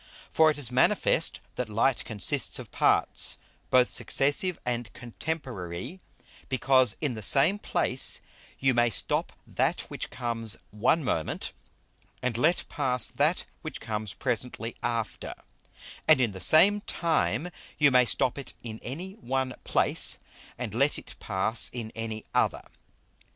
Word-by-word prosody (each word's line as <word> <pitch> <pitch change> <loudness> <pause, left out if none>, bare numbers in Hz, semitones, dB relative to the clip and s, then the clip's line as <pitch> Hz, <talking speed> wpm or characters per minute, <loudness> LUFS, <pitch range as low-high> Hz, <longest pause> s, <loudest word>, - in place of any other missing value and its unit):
_ - - -25 0.3
For 160 0 +5
it 155 - -1
is 130 -5 -2
manifest 125 +1 +2 0.2
that 125 -3 -3
Light 115 +4 +1
consists 105 -3 -1
of - - -9
Parts, - - +1 0.3
both 125 -1 +4
Successive 145 +6 +1
and 120 -2 -3
Contemporary; 120 - -6 0.5
because 130 -3 +3
in 145 -5 0
the 110 - -7
same 145 - +4
place - - +1 0.4
you 135 -1 +2
may 120 0 +3
stop - - +2
that - - 0
which - - -5
comes 115 -3 -1
one 115 +10 +1
moment, 80 - -2 0.7
and 125 -2 -2
let 160 +9 +1
pass 125 -5 0
that - - +1 0.2
which - - -7
comes 105 -2 -4
presently 115 -1 -3
after; 115 -2 -3 0.7
and - - +6
in 120 -4 +2
the 95 - -8
same 185 - +7
time 170 -1 0 0.3
you 145 -2 +5
may 125 -1 +5
stop 125 +2 +1
it 140 - -9
in 110 -2 -7
any 170 +10 -6
one 130 - -3
place, - - +2 0.4
and 115 -5 -5
let 140 +6 +2
it - - -10
pass 105 +3 -1
in 115 -3 -6
any 110 -1 -5
other. - - +1
125 Hz, 140 wpm, -27 LUFS, 115-140 Hz, 0.7 s, same